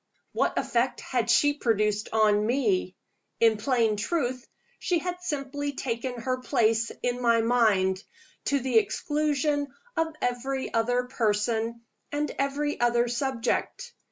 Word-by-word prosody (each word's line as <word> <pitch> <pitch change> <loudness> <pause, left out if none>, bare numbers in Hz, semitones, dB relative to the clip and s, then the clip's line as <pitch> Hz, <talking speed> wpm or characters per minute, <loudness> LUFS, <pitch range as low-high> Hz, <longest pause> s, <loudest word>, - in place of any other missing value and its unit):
What - - 0
effect 245 +2 0
had 240 -3 -1
she 290 +4 +4
produced 215 -5 0
on 210 -1 +3
me? 210 -8 +1 0.4
In 225 -1 +4
plain 225 -2 +1
truth, 255 0 -2 0.3
she 360 -2 +1
had 360 +2 -4
simply 285 -3 -3
taken 245 -1 -3
her 255 +2 -1
place 230 -3 +1
in 245 0 -1
my 235 -1 +4
mind, 205 -5 +2 0.4
to 280 - +2
the 250 -3 +4
exclusion 295 +1 -1 0.2
of 325 - +1
every 260 +2 -2
other 245 +2 +2
person 225 0 -1 0.3
and 295 +1 -1
every 285 +2 -1
other 240 0 +3
subject. 260 - -2
245 Hz, 130 wpm, -27 LUFS, 225-280 Hz, 0.4 s, she